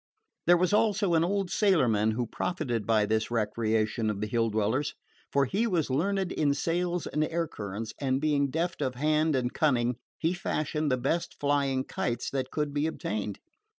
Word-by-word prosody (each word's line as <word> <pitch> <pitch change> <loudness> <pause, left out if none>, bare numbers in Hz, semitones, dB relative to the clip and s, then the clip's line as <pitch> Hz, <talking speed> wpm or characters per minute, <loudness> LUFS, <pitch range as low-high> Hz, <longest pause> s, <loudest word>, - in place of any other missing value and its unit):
There 175 0 +7
was 180 +2 +1
also 210 -3 +2
an 165 0 +4
old 195 +1 0
sailorman 125 - +3
who 120 +2 -1
profited 120 - -2
by 110 -2 +3
this 110 0 0
recreation 110 -1 0
of 105 -2 -2
the 105 - -1
Hill 115 +1 +1
dwellers; 110 +6 0 0.4
for 140 -1 +3
he 205 - 0
was 170 - 0
learned 190 +6 0
in 145 -2 +1
sails 175 +3 -1
and 150 - 0
air 165 +1 -1
currents, 105 -1 -6
and 130 -1 +1
being 145 -2 +1
deft 170 +6 -2
of 130 -1 -1
hand 155 +2 +2
and 125 -1 -1
cunning, 125 -5 +1 0.2
he 165 +2 0
fashioned 155 -4 -1
the 130 - +2
best 140 +7 -2
flying 140 -2 +1
kites 120 -2 -3
that 130 -1 -2
could 150 -2 -2
be 145 +2 +1
obtained. 105 -9 -3
140 Hz, 180 wpm, -28 LUFS, 115-165 Hz, 0.4 s, There